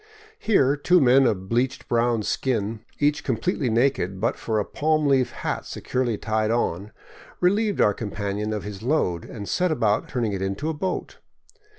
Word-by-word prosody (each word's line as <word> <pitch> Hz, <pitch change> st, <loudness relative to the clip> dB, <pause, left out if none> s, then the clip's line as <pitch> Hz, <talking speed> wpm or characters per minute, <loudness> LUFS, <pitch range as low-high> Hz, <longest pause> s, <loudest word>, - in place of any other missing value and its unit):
Here 145 Hz, -11 st, +3 dB
two 175 Hz, +5 st, +3 dB
men 130 Hz, -1 st, +5 dB
of 95 Hz, -4 st, -1 dB
bleached 125 Hz, +4 st, -1 dB
brown 120 Hz, -2 st, +1 dB
skin, 110 Hz, -2 st, -1 dB, 0.2 s
each 150 Hz, +1 st, +1 dB
completely 130 Hz, -, -1 dB
naked 115 Hz, -6 st, +1 dB
but 115 Hz, +4 st, 0 dB
for 110 Hz, -2 st, -2 dB
a 105 Hz, -, -1 dB
palm 155 Hz, 0 st, 0 dB
leaf 135 Hz, -3 st, +3 dB
hat -, -, -4 dB
securely 125 Hz, -4 st, -2 dB
tied 110 Hz, 0 st, -1 dB
on, 105 Hz, -4 st, -1 dB, 0.5 s
relieved 205 Hz, +3 st, +2 dB
our 105 Hz, -, +4 dB
companion 105 Hz, 0 st, -3 dB
of 105 Hz, -2 st, -3 dB
his 105 Hz, -2 st, -7 dB
load 115 Hz, -, 0 dB
and 100 Hz, -3 st, -8 dB
set 180 Hz, -1 st, +1 dB
about 110 Hz, -9 st, +1 dB
turning 115 Hz, -5 st, -1 dB
it 95 Hz, -, -3 dB
into 95 Hz, +11 st, -2 dB
a -, -, -1 dB
boat. 180 Hz, +5 st, -4 dB
120 Hz, 170 wpm, -24 LUFS, 105-145 Hz, 0.5 s, men